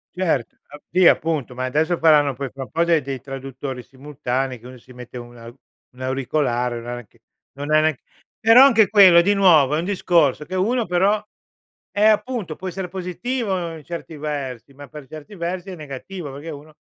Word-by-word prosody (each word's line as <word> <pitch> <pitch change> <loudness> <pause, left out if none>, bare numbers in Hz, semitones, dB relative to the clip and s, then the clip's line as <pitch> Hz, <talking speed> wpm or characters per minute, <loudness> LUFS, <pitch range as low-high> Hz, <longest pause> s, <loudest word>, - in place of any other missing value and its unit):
Cert 165 -10 -1
ap 145 - -13
sì, 180 0 +5
appunto, 150 -6 +1
ma 130 +1 -3
adesso 155 +6 0
faranno 150 -4 +4
poi 135 +1 -5
fra 135 - -7
un - - -12
po' 165 - +1
dei 170 -2 +2
dei 135 -1 -5
traduttori 135 0 -7
simultanei 130 -1 -4
che 120 - -13
uno 130 0 -11
si 125 +1 -17
mette 125 0 -10
un 120 0 -10
au 115 +1 -12 0.4
un 130 - -13
auricolare, 130 -2 -1
na 120 +1 -6
neanche 120 -4 -11 0.3
non 145 +2 -6
ha 155 - +6
neanc 155 -4 0 0.4
però 225 +4 +7
anche 225 -6 +5
quello, 190 -5 +7
di 200 +4 +2
nuovo, 160 -8 +5
è - - 0
un 170 - -3
discorso 170 -7 +1
che 185 - -6
uno 225 +6 +1
però 195 +4 +2 0.7
eh, 205 - 0
appunto, 215 -5 +1
può 190 - -6
essere 185 +1 -5
positivo 185 -1 -3
in 155 - -13
certi 170 -1 -7
versi, 140 -4 -5
ma 145 0 -12
per 150 0 -11
certi 155 +8 -11
versi 180 +2 -4
è 185 - -6
negativo 150 +2 -8
perché 145 +4 -8
uno 150 +1 -11
155 Hz, 195 wpm, -21 LUFS, 130-180 Hz, 0.7 s, però